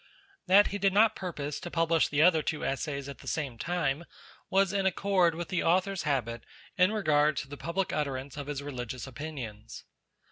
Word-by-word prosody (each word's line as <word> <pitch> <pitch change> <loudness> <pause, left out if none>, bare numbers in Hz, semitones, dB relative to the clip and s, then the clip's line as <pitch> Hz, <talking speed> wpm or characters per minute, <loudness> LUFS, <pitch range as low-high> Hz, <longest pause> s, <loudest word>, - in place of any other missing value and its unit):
That 200 +3 +6
he 205 - -4
did 195 -1 +2
not 215 +2 +5
purpose 150 -6 -4
to 175 - -7
publish 165 -1 +2
the 145 +1 +2
other 165 -2 +5
two 155 0 -3
Essays 140 0 -3
at 140 - -8
the - - -13
same 135 -7 -3
time, 170 -2 -1 0.4
was 195 0 +3
in 195 -1 +2
accord 185 -3 +2
with 170 -1 -5
the 185 - 0
Author's 185 +2 +2
habit 120 -4 -1 0.3
in 185 +1 +4
regard 155 -8 +2
to - - -3
the 145 - -8
public 170 +5 -2
utterance 140 -2 -3
of 145 -1 -6
his 145 -1 -4
religious 125 -3 -5
opinions. 130 -6 -7
155 Hz, 185 wpm, -29 LUFS, 140-185 Hz, 0.4 s, That